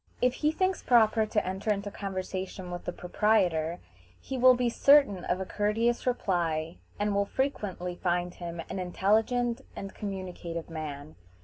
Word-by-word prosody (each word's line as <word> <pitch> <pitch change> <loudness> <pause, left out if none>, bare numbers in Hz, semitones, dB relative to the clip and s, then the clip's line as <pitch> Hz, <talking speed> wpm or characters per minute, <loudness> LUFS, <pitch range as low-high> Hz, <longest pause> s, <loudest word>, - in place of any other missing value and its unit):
If 250 0 +3
he 300 +3 +1
thinks 370 +3 0
proper 220 -2 +4
to 210 0 0
enter 190 +3 -1
into 200 0 -2
conversation 190 -2 -5
with 175 - -6
the - - -2
proprietor, 175 -4 +1 0.4
he 270 - -6
will 255 0 +7
be 245 0 +1
certain 255 -6 +5
of 180 - 0
a 190 - -3
courteous 225 +5 0
reply, 170 -8 0 0.2
and 205 0 +1
will 200 0 +2
frequently 200 -10 -2
find 175 0 -1
him 170 -1 -6
an 195 - -4
intelligent 220 +6 +1
and 195 0 -6
communicative 180 -4 -5
man. 150 -2 -6
195 Hz, 150 wpm, -29 LUFS, 175-230 Hz, 0.4 s, will